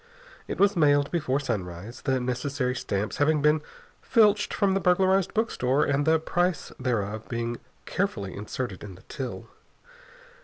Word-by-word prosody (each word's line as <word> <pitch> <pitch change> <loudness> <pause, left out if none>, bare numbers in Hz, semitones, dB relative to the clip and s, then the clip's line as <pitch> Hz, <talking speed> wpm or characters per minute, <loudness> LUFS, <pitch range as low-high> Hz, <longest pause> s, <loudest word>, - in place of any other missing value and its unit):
It - - -5
was 200 +1 +4
mailed 145 -3 +3
before 150 -5 0
sunrise, 100 -3 -5
the 130 -2 +1
necessary 125 +1 -1
stamps 105 -4 -3
having 150 +1 +3
been 150 +1 +4 0.4
filched 210 -3 +3
from 200 -2 +2
the 195 - +2
burglarized 190 +1 +3
bookstore 145 - +1
and 145 +1 0
the 160 0 +5
price 175 +2 -1
thereof 110 -3 -2
being 115 0 -2 0.3
carefully 110 - -2
inserted 105 -1 -5
in 100 -3 -8
the 95 - -17
till. 130 -3 -6
140 Hz, 145 wpm, -26 LUFS, 115-175 Hz, 0.4 s, the